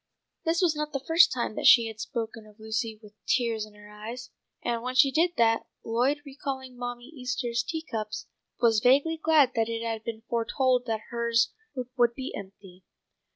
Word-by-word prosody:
This 335 +3 +2
was 330 -3 +3
not 300 0 -3
the 275 -1 -3
first 330 +1 +6
time 240 -3 -2
that - - +1
she 235 -2 +8
had 220 -1 -7
spoken 225 0 -5
of 210 +1 -19
Lucy 220 0 -3
with 210 0 -14
tears 230 -4 +1
in 210 - -18
her 210 0 -14
eyes, 230 +4 -8 0.3
and 235 -1 -1
when 255 +1 -4
she 270 +1 +6
did 340 +4 +2
that, 225 -1 +3 0.2
Lloyd, 255 +6 +1
recalling 265 -2 -6
Mammy 245 0 -5
Easter's 250 -4 -2
tea 320 +6 -4
cups, 215 -8 -4 0.3
was 225 -3 +4
vaguely 280 +8 +4
glad 305 -5 +5
that 225 -1 0
it 230 0 -3
had 225 -1 -3
been 225 -1 -6
foretold 250 +2 +1
that 220 -1 -3
hers 235 -1 +1 0.4
would 240 -1 +3
be 265 0 -5
empty. 190 -2 -11
235 Hz, 185 wpm, -28 LUFS, 225-265 Hz, 0.4 s, she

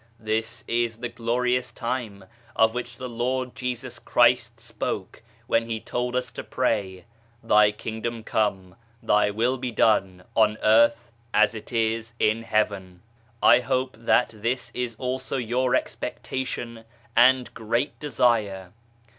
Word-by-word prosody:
This 110 0 -2
is 115 -1 0
the 120 +1 -4
glorious 125 +2 -1
time 115 -5 -4 0.3
of 110 0 +4
which 125 0 -5
the 130 - -5
Lord 125 +1 -2
Jesus 125 -1 -5
Christ 120 +1 +3
spoke - - -5 0.2
when 115 0 +1
He 115 -1 -3
told 125 +2 -3
us 125 0 -1
to - - -7
pray 100 -7 -1 0.2
" 115 0 -34
Thy 105 -2 +5
Kingdom 110 +2 -5
come, 95 -5 -1 0.3
Thy 105 0 +3
Will 120 +5 0
be 125 0 -2
done 95 -5 +2
on 110 -1 +3
earth 115 +2 +4 0.2
as 105 0 +5
it 110 - -9
is 115 0 -1
in 110 +1 +2
Heaven. 100 -5 -1 0.4
I - - +7
hope 130 +1 -1
that 115 +1 +2
this 115 +4 -2
is 125 -2 -3
also 130 +3 -3
your 125 +1 +1
expectation 120 -3 -4 0.3
and 125 +1 +5
great 115 +6 -2
desire. 105 -10 0
115 Hz, 140 wpm, -25 LUFS, 110-125 Hz, 0.4 s, I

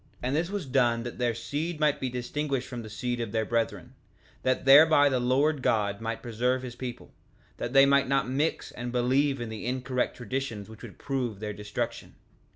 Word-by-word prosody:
3:8 - - 0
And 130 - 0
this 165 +3 0
was 200 -4 -3
done 120 -3 +2
that 120 0 -7
their 120 -2 +1
seed 150 +7 -3
might 150 -2 +2
be 130 - -2
distinguished 130 +2 -3
from 120 -2 -6
the 110 - -9
seed 120 +2 -3
of 115 -3 -4
their 110 0 0
brethren, 115 +1 -2 0.5
that 130 +1 0
thereby 145 +1 +7
the 130 -2 +1
Lord 135 +4 +2
God 105 -3 +1
might 115 0 -4
preserve 125 +2 0
his 125 -2 -7
people, 125 -1 -7 0.4
that 120 - -4
they 135 0 +8
might 140 -1 +3
not 135 0 +1
mix 140 +5 -1
and 120 0 -5
believe 135 +3 +2
in 120 -2 -5
incorrect 125 +3 -2
traditions 120 -3 -4
which 110 -1 -12
would - - -10
prove 125 -7 -3
their 105 -1 -4
destruction. 105 0 -5
125 Hz, 195 wpm, -28 LUFS, 115-135 Hz, 0.5 s, they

